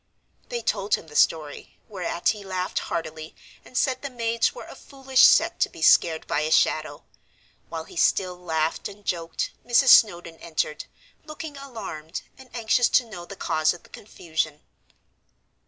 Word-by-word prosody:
They 480 -1 -4
told 200 -1 +1
him - - -10
the 150 - -13
story, 150 -2 0
whereat 180 -3 -2
he 205 -1 -2
laughed 185 -1 -2
heartily, 155 -1 -5 0.3
and 250 - -8
said 260 -1 +1
the 280 - -5
maids 230 -2 0
were - - -10
a - - -11
foolish 270 -2 0
set - - +6
to - - +2
be - - -9
scared 160 -2 +4
by - - -1
a 155 +1 -1
shadow. 155 -2 +1 0.7
While 160 -1 -5
he - - -15
still 180 +1 +2
laughed 160 -3 -2
and 205 0 -15
joked, 165 -2 -2
Mrs. 245 +2 +4
Snowdon 175 -8 +5
entered, 155 -2 -3 0.4
looking 305 -1 -8
alarmed, 220 - -7
and 265 -1 -16
anxious 235 +1 +2
to 250 - +3
know 175 -6 -9
the 200 - -10
cause 155 -3 +1
of 175 - -16
the - - -20
confusion. 160 -6 -4
180 Hz, 165 wpm, -25 LUFS, 160-235 Hz, 0.7 s, set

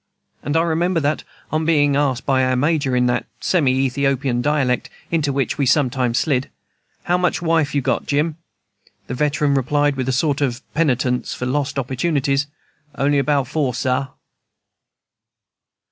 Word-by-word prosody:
And 145 +2 -1
I 165 - +3
remember 170 +1 +1
that, 145 0 -1 0.3
on 155 +1 0
being 145 -3 +3
asked 135 -3 0
by 130 -2 +2
our 130 0 +1
Major, 140 -1 +1
in 125 0 +3
that 125 0 0
semi 155 -8 +2
Ethiopian 135 -1 0
dialect 140 -3 0 0.2
into 155 -4 +1
which 135 0 -1
we 140 - +2
sometimes 125 -3 +2
slid, 135 -4 0 0.5
"How 175 +1 +1
much 180 -1 +1
wife 165 -4 +1
you 140 - +2
got, - - -1
Jim?" 150 +2 0 0.7
the - - -5
veteran 150 +2 +1
replied, 145 +2 +1
with 130 -1 -2
a - - +2
sort 140 +2 0
of 130 -1 -1
penitence 130 -5 0
for 125 - -4
lost 140 +2 -1
opportunities, 140 +1 0 0.5
"On'y 140 +1 +2
but 145 -1 +1
four, 135 -3 -1
Sah!" 130 +1 0
140 Hz, 155 wpm, -20 LUFS, 130-150 Hz, 0.7 s, I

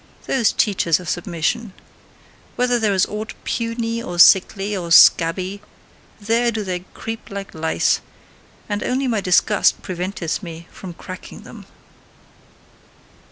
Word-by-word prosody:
Those 235 -6 +2
teachers 180 -6 +1
of 180 - -10
submission! 180 +6 -2 0.8
Wherever 245 -1 +1
there 215 -2 +1
is 190 - +3
aught 215 +1 -6
puny, 230 0 -2
or 175 -6 -6
sickly, 195 +3 +5
or 175 -3 -5
scabby, 185 +4 +5 0.6
there 230 +3 +1
do 220 -1 -3
they 185 -2 -3 0.2
creep 225 0 -7
like 200 -1 -7
lice; 160 0 0 0.7
and 205 -1 -3
only 265 +1 -1
my 225 -4 0
disgust 180 -1 +2
preventeth 180 -1 -4
me 170 -3 -9
from 180 -3 -10
cracking 185 +1 -10
them. - - -12
200 Hz, 125 wpm, -20 LUFS, 175-225 Hz, 0.8 s, sickly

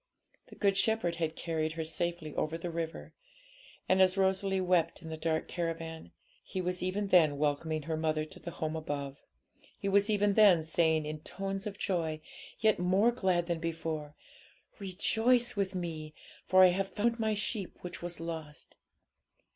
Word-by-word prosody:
The - - -13
Good 195 -2 +2
Shepherd 210 -7 +1
had 160 -1 -1
carried 160 -2 -2
her 165 0 -3
safely 160 -1 -3
over 155 +2 -1
the 170 +1 -5
river, 165 0 -5 0.7
and, 190 0 +4
as 185 +1 +4
Rosalie 190 0 +2
wept 175 -3 +1
in 160 - -7
the 160 - -4
dark 160 0 -1
caravan. 165 - -4 0.3
He 190 - -5
was 180 0 -2
even 195 +2 -1
then 155 -6 +5
welcoming 150 +1 0
her 160 +1 -2
mother 155 -1 0
to 155 - -12
the - - -6
home 160 -1 -3
above; 145 -3 -4 0.6
He 200 - -4
was 200 +2 +3
even 205 -1 +3
then 195 -6 +6
saying, 160 -1 +2
in 155 0 -4
tones 195 +5 -4
of 200 -1 -6
joy, 165 -7 -1 0.4
yet 215 -3 +4
more 190 +6 +4
glad 185 -7 +1
than 170 -1 -2
before, 160 -2 -4 0.6
'Rejoice 225 +6 +1
with 195 -2 -1
Me, 160 -4 -5 0.3
for 185 0 +7
I 185 - +8
have 190 +2 -1
found 230 +2 0
My 220 -1 +1
sheep 205 -2 -3
which 180 0 -7
was 175 0 -5
lost.' 160 -3 -7
175 Hz, 170 wpm, -31 LUFS, 160-195 Hz, 0.7 s, I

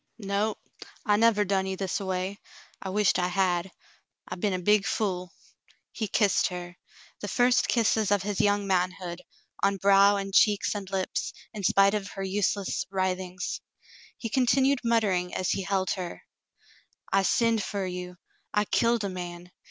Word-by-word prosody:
"No, 205 0 -1 0.5
I 205 -3 +4
never 210 -1 +3
done 190 0 0
you 190 0 -3
this 190 -1 -2
a 195 - -5
way. 185 +2 -2 0.4
I 190 - -5
wisht 205 0 +2
I 180 - +1
had. 180 0 0 0.6
I - - -5
be'n 195 +2 -1
a - - 0
big 205 +2 +2
fool." 185 -4 -2 0.6
He 220 - -3
kissed 200 0 +2
her, 175 -1 -7 0.4
the 205 - -5
first 245 +4 +3
kisses 220 -3 +2
of 205 -2 +2
his 205 0 -1
young 205 -1 +2
manhood, 180 -1 -1 0.4
on 195 0 +2
brow 200 +1 +5
and 195 -1 -4
cheeks 205 0 +4
and 200 -2 -6
lips, 190 -1 -2 0.2
in 210 -3 -6
spite 195 +2 +4
of 205 -2 -2
her 195 - -5
useless 200 0 -1
wri 190 -1 +1
things. 180 -1 -5 0.6
He 230 - -4
continued 265 +3 +3
muttering 200 -6 +1
as 185 - 0
he - - 0
held 190 0 0
her: 180 -3 -5 0.9
*'I 195 - +5
sinned 225 +2 +2
fer 200 -2 -3
you. 180 0 -6 0.4
I 210 0 +3
killed 230 +1 +2
a - - 0
man. 175 -1 -7
195 Hz, 165 wpm, -27 LUFS, 185-210 Hz, 0.9 s, brow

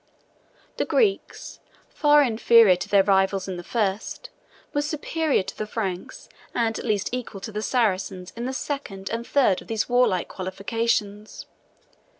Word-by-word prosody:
The - - 0
Greeks, 425 -5 -1 0.3
far 295 -1 +4
inferior 230 -4 +5
to 180 - -6
their 200 -1 +5
rivals 195 -1 +2
in 185 -2 -4
the 175 - -7
first, 215 - -2 0.4
were 290 - +1
superior 305 - 0
to - - -8
the 215 - -4
Franks, 195 -5 -5 0.3
and 225 -2 0
at - - -7
least 210 -4 0
equal 245 -5 -5
to 205 - -6
the 210 0 -3
Saracens, 195 -6 -1
in 235 +1 -4
the 260 - -2
second 260 -9 -5
and 230 +1 -4
third 255 -10 +2
of - - -15
these 220 -1 -1
warlike 245 -8 +2
qualifications. 205 +2 -3
220 Hz, 155 wpm, -24 LUFS, 195-250 Hz, 0.4 s, inferior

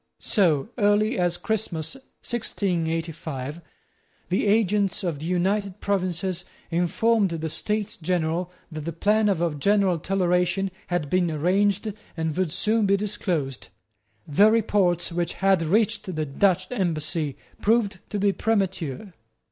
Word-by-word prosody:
So 170 - +2
early 210 +2 +3
as 175 -1 +1
Christmas 190 -7 -2 0.3
1685, 165 - -2 0.7
the 190 +3 +1
agents 205 -2 +2
of 170 -6 -2
the 155 - -5
United 195 +2 0
Provinces 185 -2 -1 0.3
informed 195 +5 +2
the 160 -1 -3
States 210 +3 -1
General 175 +1 -1 0.2
that 155 -1 -6
the 170 - -3
plan 210 +5 +2
of 175 -4 +1
a 170 -3 0
general 190 +3 +2
toleration 180 +1 +1 0.2
had 175 -4 -1
been 180 -2 +2
arranged 195 +6 +1 0.2
and 160 -2 -1
would 185 -4 0
soon 215 +3 +1
be 200 0 +4
disclosed. 180 - -2 0.6
The 200 +9 +5
reports 195 -6 +2
which 170 0 -1
had 195 -2 +2
reached 185 +1 +1
the 155 0 -1
Dutch 185 +5 +1
embassy 160 - -1 0.2
proved 210 -3 +2
to 210 - -2
be 200 0 +3
premature. 190 - -1
185 Hz, 130 wpm, -25 LUFS, 165-205 Hz, 0.7 s, The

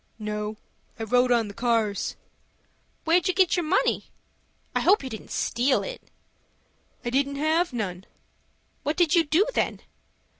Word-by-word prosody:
"No, 210 0 -4 0.4
I - - -2
rode 245 +3 +3
on 235 -3 +3
the 205 - -8
cars." 225 -3 0 0.9
"Where'd 335 +1 +3
you 370 - +1
get 375 -2 +4
your 350 - 0
money? 310 - +1 0.7
I - - +1
hope 400 -2 +4
you 260 - -6
didn't 220 - -8
steal 250 +3 +1
it." - - -6 1.0
"I 240 - -1
didn't 280 +2 +1
have 315 +4 +1
none." 190 -6 -4 0.7
"What 295 +2 -2
did 345 -4 +3
you 340 - +5
do, 320 +7 +3
then?" - - -1
260 Hz, 150 wpm, -26 LUFS, 220-330 Hz, 1.0 s, you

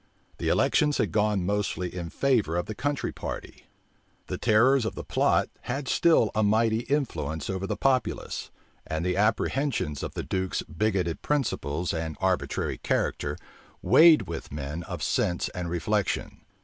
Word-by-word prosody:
The - - -2
elections 150 -1 +3
had - - 0
gone 105 -3 +1
mostly 100 -3 -1
in 85 -2 -4
favor 115 - +1
of 90 - -1
the 110 - -5
country 145 +5 -2
party. - - -7 0.6
The - - -5
terrors 120 +5 +4
of 110 - -3
the - - -5
plot - - +2 0.2
had 135 +2 -3
still 155 - +4
a 110 - +1
mighty 110 +1 +3
influence 85 - -2
over 95 0 -3
the - - -2
populace; 130 -2 0 0.4
and 80 +2 -2
the 90 0 +1
apprehensions 110 - 0
of - - -5
the - - -3
duke's 95 0 -2
bigoted 90 0 -1
principles 90 - -1
and 80 -2 -3
arbitrary 95 -1 -1
character 75 0 -1 0.5
weighed 165 -1 +7
with 85 -1 -7
men 75 +3 -4
of - - -5
sense 85 - 0
and 90 -1 -5
reflection. 95 +4 -1
100 Hz, 150 wpm, -27 LUFS, 85-120 Hz, 0.6 s, weighed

